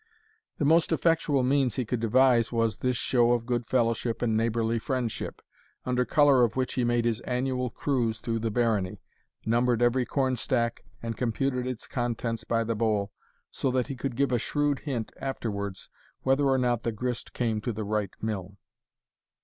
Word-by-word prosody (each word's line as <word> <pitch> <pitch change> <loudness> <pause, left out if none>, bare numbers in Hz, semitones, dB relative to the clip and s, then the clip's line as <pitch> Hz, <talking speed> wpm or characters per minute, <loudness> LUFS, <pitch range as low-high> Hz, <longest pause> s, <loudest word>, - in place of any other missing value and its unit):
The 145 - 0
most 165 +3 +4
effectual 160 -4 +2
means 130 -3 +2
he 130 - -1
could 120 +2 -2
devise 120 +1 +4
was 115 -3 +1
this 125 -1 0
show 120 -1 +3
of 120 -1 -1
good 120 -1 -1
fellowship 115 -1 0
and 110 -2 +1
neighbourly 115 0 +1
friendship, 125 -2 -3 0.4
under 125 0 +1
colour 140 -3 +5
of 115 -2 +1
which 130 -1 -1
he 125 - 0
made 120 0 +1
his 115 -2 +1
annual 125 0 -1
cruise 115 -4 -1
through 115 0 -2
the 115 0 -1
barony 110 -5 0 0.5
numbered 120 +1 +2
every 125 +1 +3
corn 130 -2 0
stack, 115 -1 -1 0.2
and 115 -1 -4
computed 125 +1 -1
its 125 -3 -4
contents 115 -2 -2
by 115 0 0
the 115 +1 -1
boll, 105 -2 0 0.4
so 135 - -1
that 130 +1 0
he 135 - -3
could 125 0 -4
give 140 +1 +1
a 120 - +2
shrewd 145 +2 0
hint 125 -7 -4
afterwards 100 -7 -4 0.4
whether 135 +2 +3
or 135 -1 +3
not 120 -2 +1
the 115 - -1
grist 120 +2 -4
came 110 -3 -1
to 120 - -2
the 110 0 -4
right 105 -1 -2
mill. 100 -3 -4
120 Hz, 180 wpm, -28 LUFS, 115-130 Hz, 0.5 s, colour